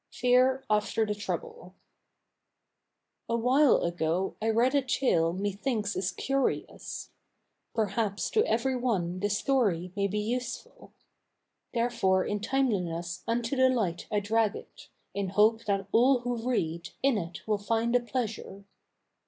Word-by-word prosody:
FEAR 255 +2 +3
AFTER 215 +1 +1
THE 210 - -1
TROUBLE 465 - -6 1.5
Awhile 250 +5 +4
ago 170 +2 -1
I 220 - +1
read 235 +4 +3
a 285 - +4
tale 245 -10 +1
methinks 205 +3 -2
is 185 0 -1
curious. 275 -1 -2 0.6
Perhaps 210 -1 -1
to 435 - +3
every 240 +4 +1
one 190 -8 -1
the 205 +2 0
story 205 -6 +1
may 200 -1 +1
be 205 +2 -3
useful; 240 +3 -4 0.8
Therefore 230 -6 +2
in 210 - -2
timeliness 180 -8 -1
unto 230 +3 -1
the 260 0 +5
light 205 -10 -1
I 210 - +2
drag 215 +1 +1
it, - - -11 0.3
In 200 -1 -2
hope 215 +4 +3
that 195 -1 0
all 250 +2 +4
who 245 0 -3
read, 170 -8 -1
in 270 -6 +3
it 170 +2 -8
will 210 -1 +1
find 230 +3 0
a - - +6
pleasure. 225 -5 -4
220 Hz, 135 wpm, -29 LUFS, 195-250 Hz, 1.5 s, a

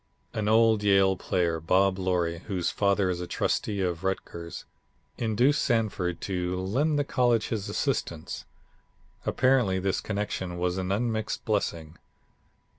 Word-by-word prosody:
An 105 -1 -2
old 110 -1 +4
Yale 95 -2 +4
player, 85 -3 0
Bob 95 +4 +2
Loree, 90 -3 0
whose 95 -5 -1
father 100 -2 +2
is 90 -1 -3
a 90 - -4
Trustee 100 +2 -1
of 90 -2 -2
Rutgers, 90 -2 -4 0.5
induced 120 +6 +2
Sanford 100 - 0
to 90 -1 -2
lend 135 +12 +1
the 145 - +2
college 120 -5 +1
his 105 -3 -3
assistance. 85 +1 -2 0.8
Apparently 125 -7 +3
this 95 0 0
connection 100 -4 -3
was 90 +1 -1
an 95 0 -2
unmixed 110 +1 -1
blessing. 85 -7 -2
95 Hz, 130 wpm, -27 LUFS, 90-110 Hz, 0.8 s, old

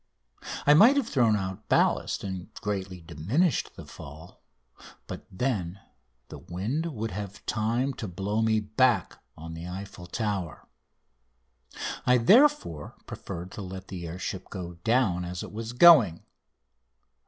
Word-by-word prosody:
I 145 - +7
might 230 - +7
have 270 -5 +1
thrown 120 - +3
out 95 +1 -5
ballast - - +2
and 95 -2 -6
greatly 95 -3 -4
diminished 100 - 0
the - - -10
fall, 80 +6 -12 0.6
but - - -8
then 95 -5 -2 0.5
the - - -9
wind 115 - -3
would 115 -8 -4
have 100 0 -7
time 115 +5 0
to 110 - -3
blow 100 +5 -2
me 110 -1 +3
back 110 -1 +1
on 80 +1 -8
the 85 +1 -7
Eiffel 95 -1 -8
Tower. 95 -5 -3 1.4
I, 125 0 +4
therefore, 205 - +3
preferred 90 +2 -7
to - - -7
let 95 0 -8
the 90 -3 -6
air 85 +2 -6
ship 95 0 -5
go 90 -3 -6
down 110 -7 +2
as 90 +1 -5
it - - -8
was 110 +2 -5
going. 125 - +7
100 Hz, 140 wpm, -27 LUFS, 90-120 Hz, 1.4 s, I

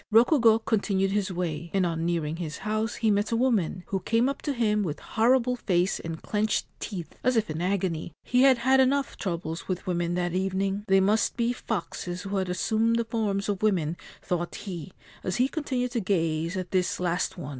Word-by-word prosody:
Rokugo 230 0 +6
continued 195 -3 +1
his 200 -1 0
way, 170 -2 -3
and 190 -2 +3
on 165 -1 -1
nearing 165 -2 -1
his 160 -3 -5
house 215 +1 -1
he 220 -2 +2
met 205 +2 +1
a - - +2
woman, 220 -8 +1
who 195 - 0
came 230 +6 +2
up 275 - -4
to 290 - -1
him 215 -4 +1
with 155 -6 -3
horrible 250 +2 +2
face 180 -4 +1
and 165 -1 -5
clenched 215 0 0
teeth, 180 -6 -6
as 255 +1 +3
if 215 -7 +1
in 155 +2 -4
agony. 180 -3 -1
He 250 +1 +2
had 265 -2 +6
had 260 +3 +3
enough 270 +1 +2
troubles 170 -3 -4
with 185 0 -3
women 175 -2 -1
that 175 -1 -1
evening. 195 +2 -1
They 195 -1 +5
must 210 +5 +2
be 235 0 +1
foxes 180 -5 -4
who 200 0 -2
had 190 -1 -1
assumed 220 +5 +1
the 235 0 0
forms 210 -4 -1
of 200 -3 -2
women, 175 -7 +1 0.3
thought 175 -1 -2
he, 180 -5 -6 0.3
as 185 - -1
he 250 - +3
continued 260 -5 -2
to 245 - 0
gaze 165 -3 0
at 185 -1 -4
this 185 -1 +1
last 180 0 -1
one. 150 -5 -6
195 Hz, 200 wpm, -27 LUFS, 175-225 Hz, 0.3 s, Rokugo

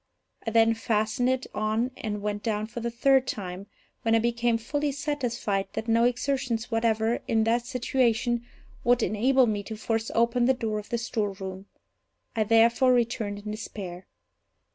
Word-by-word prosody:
I - - +3
then 225 0 +4
fastened 225 +2 0
it 260 0 0
on 215 +4 0
and 210 -2 -4
went 205 0 -2
down 215 -1 -1
for 225 +2 -7
the 235 0 -2
third 260 +2 +3
time, 190 -1 -5 0.3
when 225 0 +2
I - - +6
became 235 0 +1
fully 285 +6 -1
satisfied 245 -9 -2
that 225 - -4
no 230 +1 +4
exertions 245 -2 -1
whatever, 225 0 +1
in 220 -1 +2
that 235 +2 +1
situation, 240 -2 +1 0.4
would 245 -1 +3
enable 255 +5 +3
me 210 -3 -1
to 220 +2 -7
force 225 +1 -1
open 235 +1 +3
the 265 +1 +4
door 220 -3 -2
of 210 - -10
the 235 - 0
storeroom. 195 -4 -4 0.7
I 220 -1 +1
therefore 230 +3 +5
returned 220 -4 -1
in 210 - -3
despair. 195 -4 -7
225 Hz, 165 wpm, -27 LUFS, 215-245 Hz, 0.7 s, I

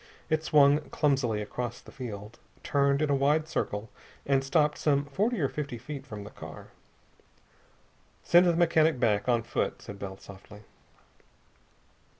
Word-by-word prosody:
It 155 0 +1
swung 145 -2 +5
clumsily 130 -8 +1
across 120 +3 -5
the - - -15
field, 110 -4 -8 0.2
turned 140 +1 +2
in 150 - +1
a - - +4
wide 150 +3 +2
circle, 105 -9 -3 0.3
and 135 -1 +2
stopped 150 +2 +1
some 145 -1 +2
forty 205 - -1
or 140 - +2
fifty 140 -3 -5
feet 140 +3 -8
from 105 -4 -7
the 100 - -10
car. - - -10 1.5
"Send 175 +1 +5
the 170 - +3
mechanic 165 -4 +3
back, 105 -2 +1
on 120 -2 +2
foot," 115 - -2
said 100 -1 -10
Bell 95 -1 -6
softly. 100 +2 -13
140 Hz, 150 wpm, -28 LUFS, 110-150 Hz, 1.5 s, swung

